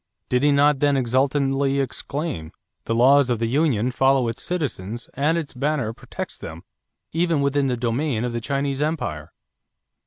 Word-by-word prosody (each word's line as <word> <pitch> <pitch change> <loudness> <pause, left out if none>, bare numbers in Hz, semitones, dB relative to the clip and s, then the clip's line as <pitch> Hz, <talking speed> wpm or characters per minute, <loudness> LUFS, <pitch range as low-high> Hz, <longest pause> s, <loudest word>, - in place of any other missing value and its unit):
Did 125 0 +2
he 145 0 +4
not 145 0 +4
then 145 -1 +3
exultantly 135 +2 +1
exclaim: 135 - -4 0.3
"The 115 - -1
laws 130 +3 +5
of 120 - +1
the 115 - -1
Union 125 -2 +1
follow 135 -1 +3
its 115 - -5
citizens 120 - -3
and 150 +5 +1
its 160 -4 -4
banner 135 -3 -1
protects - - -7
them - - -8 0.5
even 165 -1 +1
within 140 0 +1
the 125 -2 -1
domain 120 +1 -1
of 125 -1 -2
the 120 - -2
Chinese 140 +2 -1
Empire"? 150 - -2
135 Hz, 160 wpm, -23 LUFS, 120-145 Hz, 0.5 s, laws